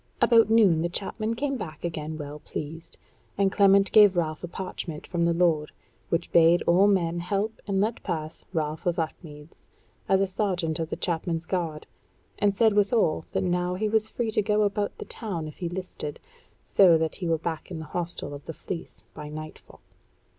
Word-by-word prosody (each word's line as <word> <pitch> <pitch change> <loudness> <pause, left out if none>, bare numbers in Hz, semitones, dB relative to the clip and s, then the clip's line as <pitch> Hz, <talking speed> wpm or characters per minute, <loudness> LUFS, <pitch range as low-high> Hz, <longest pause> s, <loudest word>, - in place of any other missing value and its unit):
About 230 -2 +5
noon 205 -8 +5
the 170 - 0
chapmen 215 +5 -2
came 275 +2 -1
back 155 -9 -8
again 160 -2 -4
well 150 0 -7
pleased; 160 +2 -7 0.4
and 195 -1 +2
Clement 195 -1 +4
gave 205 -4 +7
Ralph 155 -2 -1
a - - -3
parchment 175 -3 -6
from 170 -2 0
the 170 - +3
lord, 165 -3 +2 0.4
which 170 0 -1
bade 170 +1 +5
all 185 +4 +5
men 175 -4 +1
help 200 +5 -2
and 195 -1 0
let 215 +3 0
pass 160 -3 -4
Ralph 155 -1 -2
of 175 0 +1
Upmeads, 155 -2 -6 0.5
as 190 - +4
a 195 - +3
sergeant 185 -5 -1
of 160 -1 -2
the - - -2
chapmen's 165 -1 -2
guard, 165 -5 -3 0.5
and 200 -1 +2
said 220 -2 +4
withal 205 -6 +2
that - - 0
now 180 0 0
he 215 +4 -1
was 220 0 +2
free 230 -2 -2
to 215 - +2
go 210 0 +2
about 205 0 -1
the - - -7
town 175 -8 -4
if 150 - -10
he 175 - -3
listed, 175 -4 -6 0.4
so 180 -4 +5
that 160 -1 -2
he 180 - -3
were 165 -1 +2
back 160 0 -5
at 175 - -5
the 160 - -6
hostel 170 -3 -4
of 145 0 -9
the 160 - -6
Fleece 170 +2 -7
by 150 -1 -8
nightfall. 155 +1 -10
175 Hz, 190 wpm, -26 LUFS, 160-200 Hz, 0.5 s, gave